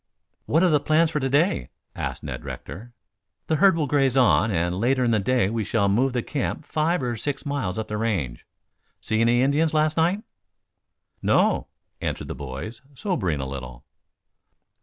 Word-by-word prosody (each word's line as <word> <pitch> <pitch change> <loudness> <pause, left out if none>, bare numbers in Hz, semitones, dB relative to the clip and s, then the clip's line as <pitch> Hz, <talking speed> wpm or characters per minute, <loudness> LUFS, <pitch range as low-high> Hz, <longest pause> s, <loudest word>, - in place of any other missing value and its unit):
"What 160 +4 +3
are 185 - +5
the 150 -2 +4
plans 155 +2 +2
for 150 - 0
to 135 -1 -1
day?" 140 - +2 0.3
asked - - -4
Ned - - -6
Rector. 115 +7 -8 0.5
"The 160 - +1
herd 195 -2 +5
will 155 - +1
graze 135 -2 +2
on, 120 -3 +4
and 85 -1 0
later 130 +3 +2
in 120 - +2
the 110 - +3
day 120 +1 +2
we 110 +1 -1
shall 105 -1 +1
move 125 +7 +2
the 125 -2 -1
camp 145 +1 -3
five 155 0 0
or 120 -1 -1
six 140 +6 -4
miles 140 -11 -2
up 110 - -3
the 105 - -3
range. 95 - -2 0.5
See 110 +1 0
any 120 +2 +4
Indians 150 +3 +2
last 155 +1 +2
night?" 175 +6 +2 1.0
"No," - - +2 0.3
answered - - -3
the - - -2
boys, 70 - -7
sobering 115 - -1
a 65 - -4
little. 65 -3 -8
125 Hz, 180 wpm, -24 LUFS, 105-150 Hz, 1.0 s, are